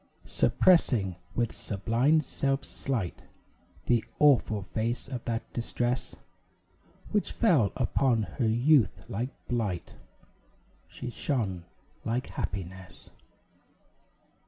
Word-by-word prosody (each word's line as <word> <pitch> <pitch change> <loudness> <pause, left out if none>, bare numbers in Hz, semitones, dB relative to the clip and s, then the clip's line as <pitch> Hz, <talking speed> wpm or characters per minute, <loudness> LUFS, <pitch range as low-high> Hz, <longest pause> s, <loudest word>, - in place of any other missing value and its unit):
Suppressing, 115 - +3 0.2
with 120 -1 +1
sublime 115 - +1
self 135 -1 -1
slight, 115 -11 -3 0.6
The 120 -2 +3
awful 125 -8 +4
face 115 +6 -2
of 130 -3 -5
that 115 -1 -3
distress 120 +1 -2 1.0
Which 210 - +1
fell 155 - +3
upon 125 -2 +2 0.2
her 120 - +3
youth 120 +2 +3
like 120 +6 -2 0.2
blight, 105 -8 -2 0.9
She 125 - -7
shone 100 -11 -2 0.4
like 120 +3 -2
happiness. 95 -1 -6
120 Hz, 90 wpm, -29 LUFS, 105-135 Hz, 1.0 s, awful